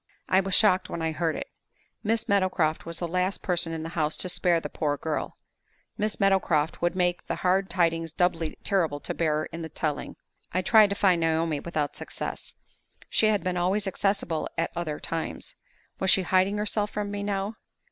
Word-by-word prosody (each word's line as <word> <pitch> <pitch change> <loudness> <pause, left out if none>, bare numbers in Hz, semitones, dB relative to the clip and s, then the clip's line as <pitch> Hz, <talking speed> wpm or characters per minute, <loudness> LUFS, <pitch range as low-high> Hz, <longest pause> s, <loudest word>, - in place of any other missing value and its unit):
I 185 - +4
was 195 -1 +1
shocked 190 -4 +4
when 165 - -4
I 160 - 0
heard 160 +1 -1
it. - - -4 0.6
Miss 225 +1 0
Meadowcroft 185 -6 +1
was 170 -1 -5
the 175 - -3
last 185 +3 -1
person 175 -2 +1
in 160 -1 -4
the 165 - -5
house 155 -2 -1
to 185 - -1
spare 175 -1 +2
the - - -5
poor 145 -2 -1
girl; 155 0 -3 0.6
Miss 215 0 -1
Meadowcroft 180 -6 +2
would 175 +1 +1
make 175 -1 0
the - - -1
hard 190 +1 +3
tidings 165 -2 +1
doubly 165 -1 0
terrible 165 -7 +1
to - - -4
bear 155 -2 +1
in 165 - -5
the 160 - -5
telling. 150 -1 -3 0.4
I 185 +1 +1
tried 215 -1 +6
to 200 - -1
find 185 -4 +3
Naomi, 160 -2 +1
without 150 -2 -2
success. - - -5 0.6
She 220 - +4
had 210 -5 +2
been 185 -1 -1
always 190 +4 +1
accessible 190 -4 -1
at 165 - 0
other 160 -3 -3
times. 165 -1 -4 0.4
Was 190 - +2
she 190 - +5
hiding 190 +3 +2
herself 210 0 0
from 205 -1 -3
me 205 0 -3
now? 200 +2 -2
180 Hz, 190 wpm, -27 LUFS, 165-195 Hz, 0.6 s, tried